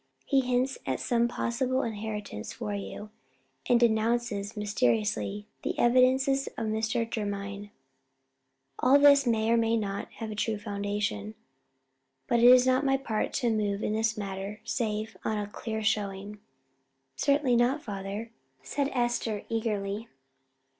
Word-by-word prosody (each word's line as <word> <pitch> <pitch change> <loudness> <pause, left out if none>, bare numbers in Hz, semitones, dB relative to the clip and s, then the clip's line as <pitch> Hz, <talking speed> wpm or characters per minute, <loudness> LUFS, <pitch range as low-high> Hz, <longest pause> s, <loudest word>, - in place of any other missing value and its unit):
He 275 - +3
hints 255 +1 0
at - - -2
some 235 -1 +2
possible 255 +2 -1
inheritance 210 - -5
for 105 - -4
you, 100 - -6 0.6
and 240 - +5
denounces 225 -2 +1
mysteriously 125 - 0 0.2
the - - -2
devices 260 +3 +3
of 225 - -2
Mr. 220 +2 0
Jermyn. 205 -2 -4 1.1
All 260 +3 +6
this 280 -2 +6
may 225 -1 +2
or 235 - +4
may 230 0 +2
not 200 -2 -3
have 225 -2 -6
a - - -5
true 215 +1 -1
foundation. 205 - -3 0.9
But 235 - +2
it 240 +1 +8
is 255 0 +7
not 260 +2 +3
my 270 -1 +3
part 225 -5 -2
to 240 -4 +1
move 205 -1 -1
in 210 - 0
this 220 0 0
matter 200 +1 -5
save 220 -3 -2
on 215 - -1
a 205 - -2
clear 220 +1 -5
showing." 205 -1 -2 0.8
"Certainly 280 -4 +2
not, 255 +5 +2
father," 200 +2 -5 0.3
said 280 -1 -1
Esther, 240 -4 -1
eagerly. 215 -1 -2
220 Hz, 140 wpm, -28 LUFS, 205-240 Hz, 1.1 s, it